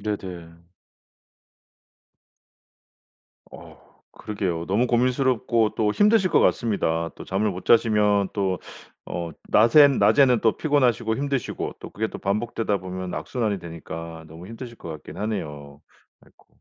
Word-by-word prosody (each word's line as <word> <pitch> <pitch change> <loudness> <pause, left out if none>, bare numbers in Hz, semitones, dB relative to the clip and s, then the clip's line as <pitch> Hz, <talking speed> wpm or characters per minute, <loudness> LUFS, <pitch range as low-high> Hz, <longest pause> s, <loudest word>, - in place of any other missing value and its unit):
네네. 90 -5 -6 2.9
어우 - - -13 0.4
그러게요. 90 -6 -4
너무 105 +6 +1
고민스럽고 125 -2 +1
또 105 -1 +2
힘드실 205 - +3
것 - - +4
같습니다. 85 -8 0
또 - - -9
잠을 100 +3 0
못 90 -1 -7
자시면 105 -3 +3
또 95 -3 -1 0.5
어 85 -1 -5 0.2
낮에는 135 +5 +6
낮에는 130 -4 +5
또 110 - +2
피곤하시고 125 -7 +1
힘드시고 140 -2 -3
또 - - -9
그게 110 +2 -2
또 - - -8
반복되다 105 +1 -1
보면 95 -1 -6
악순환이 110 -6 -2
되니까 80 -1 -8
너무 80 +3 -11
힘드실 115 +2 -9
것 85 - -9
같기는 75 +5 -9
하네요. 75 -9 -5 0.4
아이코. - - -26
105 Hz, 295 characters per minute, -24 LUFS, 90-120 Hz, 2.9 s, 낮에는